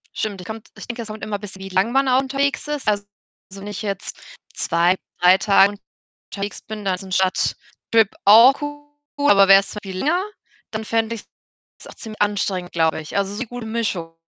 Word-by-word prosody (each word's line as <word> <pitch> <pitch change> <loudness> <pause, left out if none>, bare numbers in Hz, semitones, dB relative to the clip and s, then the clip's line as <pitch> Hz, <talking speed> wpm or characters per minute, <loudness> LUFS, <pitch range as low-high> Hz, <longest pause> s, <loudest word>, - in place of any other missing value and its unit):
Stimmt, 205 -3 -3
ich 180 - -11
kommt 220 0 -8
ich - - -10
denke, 240 0 -5
es - - -10
kommt 215 0 -8
immer 205 -1 -3
bisschen 195 -2 -10
wie 195 - -7
lang 190 +5 +1
man 270 +1 +2
auch 255 0 +4
unterwegs 275 +2 -1
ist. 295 -4 -4
Also, 205 -1 +1 0.5
wenn 195 +1 -9
ich 205 -2 -6
jetzt 200 -3 -5 0.4
2, 170 +2 +2 0.3
3 180 +1 +7
Tage 200 0 +4 0.6
unterwegs 200 0 -5
bin, 215 -1 -8
dann 190 -1 +1
ist 180 - -7
ein 190 - -9
Stadttrip 195 +3 0
auch 230 +6 +7
cool, 290 0 -4
aber 195 -1 +6
wär's 195 +1 +5
viel 190 -2 -7
länger, 345 - +1 0.5
dann 220 0 -4
fände 225 +1 0
ich's 215 - -12 0.6
auch - - -12
ziemlich 220 -3 -10
anstrengend, 200 -3 -1
glaube 160 -1 +1
ich. 155 +4 -7
Also, 200 0 -1
so 235 +5 -3
gute 245 0 -8
Mischung 205 -8 -3
210 Hz, 195 wpm, -21 LUFS, 195-235 Hz, 0.6 s, 3